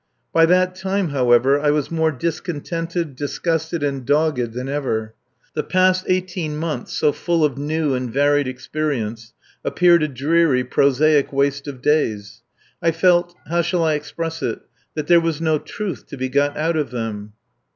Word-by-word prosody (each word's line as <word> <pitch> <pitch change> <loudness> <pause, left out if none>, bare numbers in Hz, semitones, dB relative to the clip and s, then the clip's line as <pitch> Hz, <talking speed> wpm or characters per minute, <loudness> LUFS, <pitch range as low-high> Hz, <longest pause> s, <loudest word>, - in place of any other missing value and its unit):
By 165 0 +5
that 185 +1 +3
time, 190 -1 -1
however, 130 0 +3
I 145 0 +1
was 150 0 0
more 160 -1 +1
discontented, 165 +1 -3
disgusted, 160 +3 -2
and 140 -2 -2
dogged 145 -4 +1
than 125 +2 -4
ever. 120 -6 -2 0.4
The - - -1
past 185 0 +2
eighteen 180 -4 -1
months, 160 0 -4
so 150 - +2
full 170 0 +1
of 140 -4 -1
new 150 0 0
and 125 -2 -2
varied 145 +1 +2
experience, 125 -4 -4 0.3
appeared 175 -1 +4
a 155 - +1
dreary, 140 0 +2
prosaic 140 +3 +3
waste 140 0 0
of 135 -2 -8
days. 110 -8 0 0.4
I 165 - +3
felt 175 +1 +2
how 170 +1 +1
shall 170 0 0
I 160 -1 +2
express 160 +2 -4
it? 115 - -2 0.3
that 155 -2 -2
there 170 +1 +5
was 165 -2 -1
no 160 -2 +1
truth 205 +1 -6
to 140 - -9
be 130 0 -2
got 145 +2 +1
out 160 +2 0
of 150 -3 -1
them. 110 -4 -5
150 Hz, 165 wpm, -21 LUFS, 135-165 Hz, 0.4 s, By